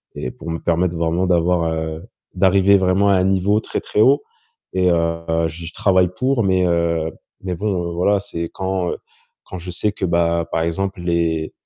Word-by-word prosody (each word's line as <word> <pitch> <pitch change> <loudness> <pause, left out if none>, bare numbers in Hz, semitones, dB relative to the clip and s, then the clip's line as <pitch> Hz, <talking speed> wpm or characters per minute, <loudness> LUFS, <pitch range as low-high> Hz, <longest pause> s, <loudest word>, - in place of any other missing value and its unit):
et 65 - -4
pour 85 - -9
me 80 - -2
permettre 85 +1 0
vraiment 85 +3 0
d'avoir, 85 -1 +2
heu, 80 0 -4 0.3
d'arriver 95 +1 +4
vraiment 95 +2 +2
à - - +5
un 90 - +2
niveau 95 +2 +2
très, - - -4
très 105 - 0
haut, 135 +6 +4 0.5
et 90 -1 +2
heu, 85 -1 0
j'y 85 0 -8
travaille 95 -2 +3
pour, 130 -2 +1
mais, 95 -2 +2
heu 85 -2 0 0.3
mais 95 -1 -3
bon, 90 -3 -2
heu, - - -5
voilà, 95 +4 +2
c'est 85 -3 -5
quand 95 -1 -2 0.5
quand 90 - -8
je 90 +1 -8
sais 105 +4 -1
que 100 - -3
bah, 85 -1 +1
par 80 - 0
exemple 95 +3 -2
les 85 -2 -1
90 Hz, 185 wpm, -20 LUFS, 85-95 Hz, 0.5 s, à